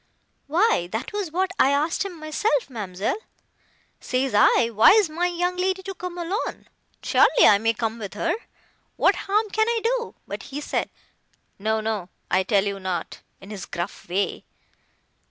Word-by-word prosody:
"Why 315 - +2
that 225 - -4
was 405 -6 -3
what 375 +3 0
I 265 - +6
asked 295 +6 +1
him 360 -4 -7
myself, 310 - 0
ma'amselle. 205 - -3 0.8
Says 255 0 -1
I, 230 +3 +5
'Why 220 - +7
is 410 -7 +3
my 345 +3 0
young 355 +1 -1
lady 375 +1 0
to 390 +1 -5
come 360 -1 -7
alone?—Surely 380 +6 +1
I 200 - +6
may 225 +1 +1
come 225 +1 -2
with 200 -3 -7
her!—What 340 +7 -2
harm 420 +2 0
can 440 +1 +2
I 470 -1 +1
do?' 475 0 -1
But - - -5
he 285 +1 -4
said 295 - -2 0.7
'No—no—I 215 -3 -1
tell 200 0 +2
you 200 -1 -3
not,' 185 -2 -4 0.2
in 195 - -12
his 200 -2 -7
gruff 175 +1 -6
way. 195 +3 -1
290 Hz, 155 wpm, -24 LUFS, -, 0.8 s, Why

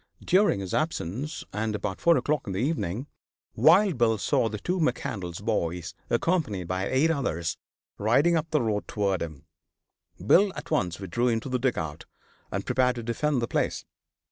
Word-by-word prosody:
During 185 - +3
his 95 -2 -5
absence, 150 - -2
and 110 0 -1
about 100 -2 -4
four 170 -1 +5
o'clock 150 -4 -1
in 95 - -3
the 95 - -2
evening, 125 - -1 0.5
Wild 190 -6 +5
Bill 115 -2 +3
saw 110 +2 +1
the 105 - -4
two 180 - -2
McCandlas 100 - -2
boys, 85 -5 -1 0.2
accompanied 120 - 0
by 95 +2 -2
eight 145 +5 +3
others, 85 - -1 0.4
riding 140 +11 +3
up 160 0 -1
the 150 -5 +1
road 105 -2 -1
towards 100 -4 0
him. 80 -2 -8 0.7
Bill 185 - +4
at - - -8
once 90 0 0
withdrew 100 +6 -1
into 115 +2 0
the 125 0 0
dugout 85 - -2 0.5
and - - -3
prepared 125 -1 +2
to 120 - -5
defend 125 +3 0
the - - 0
place. - - -1
115 Hz, 170 wpm, -27 LUFS, 95-150 Hz, 0.7 s, four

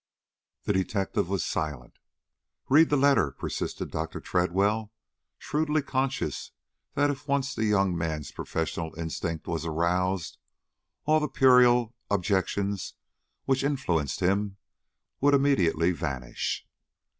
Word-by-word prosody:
The - - 0
detective 95 0 -1
was 95 -7 0
silent. 75 -6 -4 0.7
"Read 155 +4 +6
the 145 - +3
letter," 140 - +4
persisted - - -4
Dr. 80 +1 -4
Tredwell, 100 +5 0 0.5
shrewdly 155 0 0
conscious 135 0 -2 0.5
that 145 +1 +3
if 140 +1 -8
once 140 0 0
the 110 - -1
young 100 -4 +2
man's 80 -3 -3
professional 80 0 -3
instinct 80 0 -4
was 85 -1 -2
aroused, 85 +2 -1 0.7
all 155 +1 +4
the 150 - -1
puerile 125 -3 +5 0.2
objections 100 0 0 0.5
which 135 0 +1
influenced 110 - -1
him 100 +2 +1 0.6
would 145 +1 +4
immediately 90 - +3
vanish. 70 -8 -3
100 Hz, 110 wpm, -27 LUFS, 85-135 Hz, 0.7 s, Read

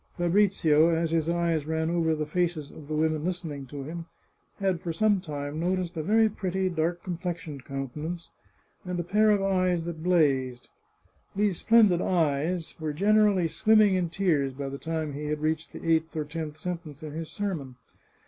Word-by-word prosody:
Fabrizio, 175 -4 +3
as 165 -1 0
his 165 -1 +1
eyes 170 -3 0
ran 160 +1 0
over 165 -2 +1
the 155 0 -2
faces 165 -2 -1
of 150 - -12
the 155 - -3
women 155 0 +1
listening 160 -6 -4
to 140 +1 -7
him, 165 +4 -7 0.5
had 190 -4 0
for 170 - -3
some 205 +3 +2
time 145 -2 -5
noticed 180 0 -1
a 160 - -2
very 220 +6 +4
pretty 190 -2 -1
dark 170 0 -1
complexioned 170 -5 -5
countenance, 150 +6 -5 0.5
and 180 -1 -3
a - - -1
pair 210 +5 +3
of 205 -2 +3
eyes 185 -3 +1
that 165 -2 -6
blazed. 135 -8 +1 0.7
These 200 -3 +1
splendid 215 -6 +5
eyes 165 0 0
were 155 -2 -3
generally 205 0 +3
swimming 215 +3 +4
in 180 -2 0
tears 160 -7 +1
by 140 0 -4
the 140 0 -6
time 160 -2 -3
he 150 +2 -5
had 150 0 -1
reached 155 +1 -1
the - - -9
eighth 160 0 +1
or 155 - -1
tenth 155 0 -5
sen 175 +2 -3
tence 155 -2 -12
in 150 -1 -6
his 160 0 -5
sermon. 165 -11 -4
165 Hz, 180 wpm, -27 LUFS, 155-180 Hz, 0.7 s, splendid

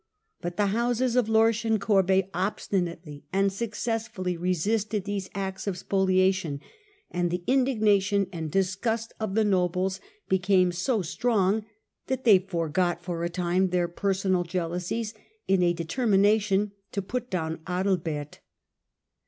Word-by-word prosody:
But 175 0 -4
the 205 - +3
houses 240 +1 +1
of 245 -3 +2
Lorsch 220 0 +3
and 220 -1 +1
Corbey 195 -2 +3
obstinately 175 -5 -3
and 195 0 +2
successfully 220 -3 -3
resisted 195 +4 0
these 200 -1 -4
acts 190 0 -4
of 190 -3 -1
spoliation; 185 -5 +1 0.5
and 175 0 0
the 175 +1 -3
indignation 215 -6 +2
and 160 -2 -4
dis 190 +3 +1
gust 225 +2 -2
of 215 -3 -3
the 220 - +4
nobles 185 -1 +1 0.3
became 185 -1 +3
so 185 +5 0
strong 210 +2 +1 0.4
that 260 -1 -2
they 210 -5 +7
forgot 175 -1 -1
for 170 -1 -3
a 170 - 0
time 180 +2 +1
their 175 -1 +1
personal 190 0 0
jealousies 180 +5 -3 0.3
in 190 -1 +3
a 175 -1 +4
determination 200 +2 +2 0.2
to 200 - -2
put 245 +5 -4
down 160 -3 -2
Adalbert. 175 -5 -2
190 Hz, 135 wpm, -27 LUFS, 180-215 Hz, 0.5 s, they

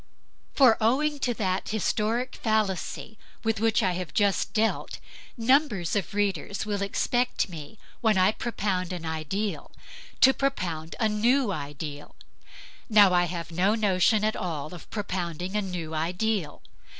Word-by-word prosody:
For 255 -5 +6
owing 285 +6 +2
to 250 -3 0
that 190 -3 -1
historic 220 +3 0
fallacy 215 -1 -1 0.2
with 225 -2 0
which 225 0 +2
I 185 - +2
have 175 -4 -5
just 200 -2 +2
dealt, 220 +1 0 0.4
numbers 230 - +2
of 200 0 -2
readers 205 0 -1
will 205 -2 -2
expect 245 +4 0
me, 165 +5 -9 0.2
when 220 -4 +2
I 185 +2 +5
propound 195 -6 -2
an 170 -2 -6
ideal, 160 +7 -3 0.5
to 265 - +8
propound 170 -14 -2
a 220 - +3
new 230 +3 +2
ideal. 145 -2 -6 0.7
Now 205 -4 +6
I 175 0 +4
have 170 -1 -5
no 185 +6 +2
notion 210 0 +2
at 215 0 +1
all 155 -3 -4
of 175 - -11
propounding 180 -3 -4
a 210 - +2
new 175 -5 -5
ideal. 180 +3 -2
200 Hz, 140 wpm, -27 LUFS, 175-220 Hz, 0.7 s, to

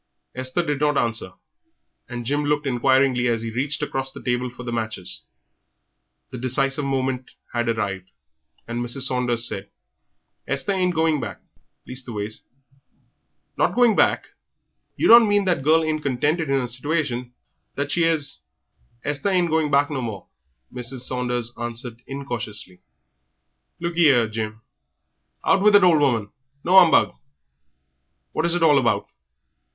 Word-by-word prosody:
Esther 130 +7 -2
did 145 -3 -1
not 150 -1 +2
answer, 115 -5 -1 0.8
and 120 -1 -6
Jim 145 +4 0
looked 150 0 0
inquiringly 130 -1 +2
as 115 -1 0
he 115 - -4
reached 140 +6 -1
across 135 -2 -2
the - - -11
table 125 0 -1
for 120 +1 -11
the 120 - -5
matches. 110 -5 -5 1.1
The 125 - -6
decisive 135 +3 0
moment 130 -1 -2 0.2
had 120 -1 0
arrived, 100 -5 -2 0.6
and 120 +1 -3
Mrs. 120 +3 -2
Saunders 125 -3 +1
said 100 +1 -5 0.8
"Esther 140 +8 0
ain't 185 -2 +1
a - - -13
going 160 -2 +2
back; - - -6 0.5
leastways 110 -5 -5 0.6
" - - -47
"Not - - +2
going 240 -3 +4
back! - - +2 0.7
You - - +1
don't 230 -2 +8
mean 205 -1 +2
that 175 -7 +1
she 150 - 0 0.2
ain't 155 -1 -1
contented 145 +4 0
in 135 0 +2
her 125 - -2
situation 125 -1 -2 0.4
that 140 0 -2
she 165 0 +3
'as 155 -4 -1 0.3
" 65 - -39
"Esther 145 +6 -1
ain't 180 -3 +1
going 160 -1 +1
back 145 +1 +2
no 135 -3 -2
more," 110 -5 -6 0.5
Mrs. 125 +1 -5
Saunders 125 -2 -2
answered, 120 0 -5
incautiously. 120 -9 -6 1.0
"Look 170 0 -3
ee 170 -2 +6
'ere, 120 -4 +4
Jim 110 0 -5 0.4
" 65 -1 -50
"Out 190 0 +4
with 210 0 +5
it, 200 - +7
old 170 -4 +5
woman 115 -8 +1 0.3
no 185 +2 +7
'umbug! 170 -3 +5 1.2
What 170 - 0
is 170 - +2
it 175 - 0
all 150 -3 +6
about? 120 -3 0
130 Hz, 155 wpm, -23 LUFS, 120-150 Hz, 1.2 s, don't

